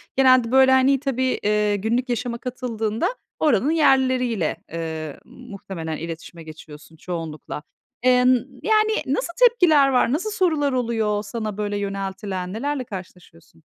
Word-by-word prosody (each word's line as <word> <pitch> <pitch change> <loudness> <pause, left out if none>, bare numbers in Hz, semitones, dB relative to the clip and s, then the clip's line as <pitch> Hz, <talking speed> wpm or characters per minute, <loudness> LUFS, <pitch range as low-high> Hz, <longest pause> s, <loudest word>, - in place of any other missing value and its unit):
genelde, 255 -3 +4
böyle, 265 0 +6
hani, 260 +1 +4
tabii, 260 -2 -1
ııı, 210 0 +2
günlük 235 +5 -1
yaşama 240 0 -2
katıldığında 230 -3 -3 0.3
oranın 290 -1 +2
yerlileriyle, 255 - +2 0.2
ııı, 160 -3 -5
muhtemelen 195 -9 -7
iletişime 165 0 -8
geçiyorsun 155 0 -13
çoğunlukla. 160 -3 -6 0.4
Eee, 250 0 +4
n - - +6 0.3
yani, 435 0 +3
nasıl 345 -9 -2
tepkiler 350 - +5
var? 250 -1 +2
Nasıl 370 +8 -1
sorular 315 -8 +1
oluyor 225 -4 0
sana, 215 -2 -5
böyle, 205 -1 -2
yöneltilen? 195 -1 -4
Nelerle 275 +3 -2
karşılaşıyorsun? 180 -6 -11
230 Hz, 125 wpm, -22 LUFS, 190-265 Hz, 0.4 s, böyle